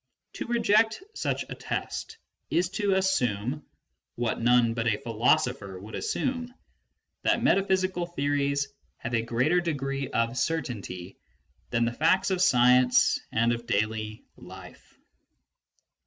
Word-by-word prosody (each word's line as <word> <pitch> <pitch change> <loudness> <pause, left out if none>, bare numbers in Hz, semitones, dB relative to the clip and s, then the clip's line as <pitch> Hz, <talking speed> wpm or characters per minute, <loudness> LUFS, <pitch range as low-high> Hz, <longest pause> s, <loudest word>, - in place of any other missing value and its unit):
To - - -5
reject 225 - +2
such - - -2
a - - -6
test 450 - -5 0.3
is 175 +1 +1
to 200 0 0
assume 125 - +1
ŌĆö 150 - -10 0.5
what 120 -1 -2
none 120 -1 +4
but 115 0 -2
a 105 -3 +2
philosopher 120 -4 0
would 105 +4 -11
assume 250 -2 -2
ŌĆö 245 - -20 0.7
that - - +1
metaphysical 185 -2 +2
theories 140 -3 0 0.3
have 120 - -6
a 115 - +2
greater 125 +10 +1
degree 140 -4 -2
of 115 +2 0
certainty 100 - -3 0.5
than 115 -1 +1
the 120 - -1
facts 165 +8 +2
of 185 -1 0
science 125 -4 +5
and 115 +1 +2
of 120 0 -6
daily 110 +1 -2
life. - - -13
130 Hz, 130 wpm, -27 LUFS, 115-180 Hz, 0.7 s, science